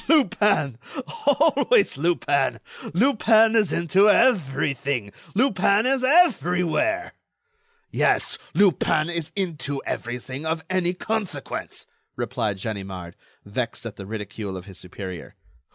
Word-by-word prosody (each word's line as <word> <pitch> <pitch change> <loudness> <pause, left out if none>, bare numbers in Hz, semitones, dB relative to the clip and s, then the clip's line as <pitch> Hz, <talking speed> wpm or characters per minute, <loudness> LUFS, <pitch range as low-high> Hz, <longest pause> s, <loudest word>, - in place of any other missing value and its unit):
"Lupin! 205 - +2 0.5
always 310 - +3
Lupin! 140 -3 0 0.3
Lupin 225 - +4
is 210 -8 +3
into 185 +6 +3
everything; 140 - +1 0.2
Lupin 205 -2 +3
is 260 0 +1
everywhere!" 310 - +2 0.8
"Yes, - - +1 0.2
Lupin 175 -4 +2
is 170 -3 -4
into 150 -8 -3
everything 125 +4 -5
of 160 0 -2
any 180 -1 0
consequence," 220 +1 -4 0.3
replied 105 -5 -2
Ganimard, 95 -4 -6 0.3
vexed 115 +4 -4
at 115 - -6
the 95 - -8
ridicule 105 -2 -6
of 90 - -9
his 95 -2 -11
superior. 90 0 -8
170 Hz, 105 wpm, -24 LUFS, -, 0.8 s, Lupin